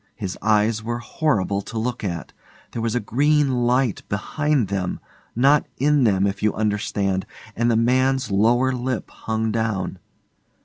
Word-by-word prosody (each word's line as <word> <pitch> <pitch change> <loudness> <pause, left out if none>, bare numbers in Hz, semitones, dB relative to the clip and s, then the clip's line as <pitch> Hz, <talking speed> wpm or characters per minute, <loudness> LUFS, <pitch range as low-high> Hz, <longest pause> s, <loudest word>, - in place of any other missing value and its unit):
His 95 -5 -4
eyes 110 0 +2
were 120 +2 -3
horrible 115 - 0
to 115 - -7
look 120 +1 -2
at. 85 -4 -4 0.4
There 115 - -4
was 115 0 -1
a - - +2
green 135 +1 +2
light 125 -3 +1
behind 140 +5 0
them, 95 -2 -2 0.4
not 140 +5 +4
in 145 -1 +3
them, 100 -3 +3
if 100 0 -2
you 105 - +1
understand, 100 -3 -1 0.3
and 120 +1 +1
the 115 - +3
man's 130 +2 +2
lower 120 +6 +3
lip 125 -1 -3
hung 110 0 -2
down. 105 -5 -2
115 Hz, 150 wpm, -22 LUFS, 105-130 Hz, 0.4 s, not